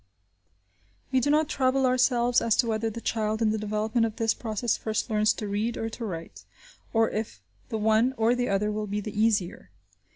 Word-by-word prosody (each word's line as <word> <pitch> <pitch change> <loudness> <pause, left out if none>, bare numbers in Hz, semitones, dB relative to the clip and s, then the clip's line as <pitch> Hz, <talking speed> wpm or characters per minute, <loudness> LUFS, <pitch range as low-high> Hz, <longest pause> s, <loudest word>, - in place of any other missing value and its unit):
We 260 - +3
do 255 - 0
not 305 +1 +3
trouble 265 -2 +1
ourselves 245 -1 +3
as 230 -1 +2
to 245 - +2
whether 225 0 -1
the 230 +2 -7
child 220 -1 -1
in 220 -2 +2
the 220 - -1
development 215 +2 0
of 225 -1 -1
this 225 -2 +1
process, 225 0 -1
first 220 +2 -3
learns 215 0 +3
to 210 - -5
read 210 +4 -2
or 225 - -3
to 235 - -7
write, 165 -5 -7 0.5
or 225 -1 +2
if 215 - -4 0.3
the 220 - -2
one 220 +4 +2
or 225 +2 +3
the 245 0 -1
other 200 +2 +1
will 210 0 -3
be 205 +1 -2
the 210 +1 -6
easier. 210 - 0
220 Hz, 200 wpm, -27 LUFS, 215-240 Hz, 0.5 s, We